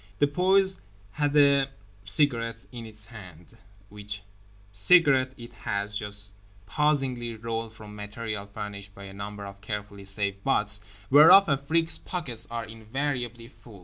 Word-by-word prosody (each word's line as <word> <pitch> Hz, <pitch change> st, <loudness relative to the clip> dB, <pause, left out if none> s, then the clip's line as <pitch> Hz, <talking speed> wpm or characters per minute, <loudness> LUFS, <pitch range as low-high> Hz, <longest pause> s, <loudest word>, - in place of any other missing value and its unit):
The 145 Hz, -, +4 dB
poise 190 Hz, +5 st, +4 dB, 0.3 s
has 145 Hz, -1 st, 0 dB
a 140 Hz, -2 st, +5 dB, 0.4 s
cigarette 115 Hz, +1 st, +1 dB
in 120 Hz, -2 st, -8 dB
its 105 Hz, -1 st, -9 dB
hand, 95 Hz, -4 st, -13 dB, 0.3 s
which 105 Hz, 0 st, -7 dB, 0.5 s
cigarette 130 Hz, -, +5 dB
it 120 Hz, 0 st, -11 dB
has 100 Hz, +1 st, -3 dB
just 105 Hz, 0 st, -3 dB, 0.3 s
pausingly 130 Hz, -2 st, 0 dB
rolled 115 Hz, 0 st, -4 dB
from 105 Hz, -1 st, -11 dB
material 105 Hz, 0 st, -5 dB
furnished 100 Hz, 0 st, -7 dB
by 100 Hz, -, -10 dB
a 95 Hz, 0 st, -9 dB
number 100 Hz, +1 st, -7 dB
of 100 Hz, 0 st, -10 dB
carefully 105 Hz, -2 st, -6 dB
saved 100 Hz, 0 st, -2 dB
butts 105 Hz, 0 st, +2 dB, 0.3 s
(whereof 160 Hz, +8 st, +9 dB
Afrique's 160 Hz, +4 st, +1 dB
pockets 135 Hz, -11 st, -4 dB
are 115 Hz, -1 st, -4 dB
invariably 120 Hz, +1 st, -4 dB
full). 110 Hz, -4 st, -16 dB
115 Hz, 135 wpm, -27 LUFS, 105-135 Hz, 0.5 s, whereof